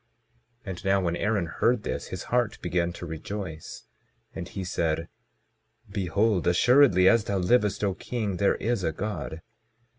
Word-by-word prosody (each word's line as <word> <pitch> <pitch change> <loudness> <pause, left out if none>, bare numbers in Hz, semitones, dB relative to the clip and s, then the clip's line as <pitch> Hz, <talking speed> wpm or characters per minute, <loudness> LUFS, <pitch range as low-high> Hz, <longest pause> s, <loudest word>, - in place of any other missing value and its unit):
22:8 95 - -4
And 90 +2 -8
now 100 0 +3
when 85 -2 0
Aaron 105 -1 0
heard 110 +7 +1
this, - - -4
his - - -6
heart - - +1
began 85 -1 0
to 85 - -7
rejoice, 80 0 -6 0.5
and - - -6
he 95 - -6
said: 80 -2 -1 0.8
Behold, 100 +1 +1
assuredly 95 0 +5
as 115 +2 +5
thou 100 - -1
livest, 105 +2 +2
O 100 -2 +1
king, 105 -1 -3
there 100 +1 +3
is 115 -3 -1
a 80 - +1
God. 85 -4 -5
95 Hz, 155 wpm, -27 LUFS, 85-105 Hz, 0.8 s, assuredly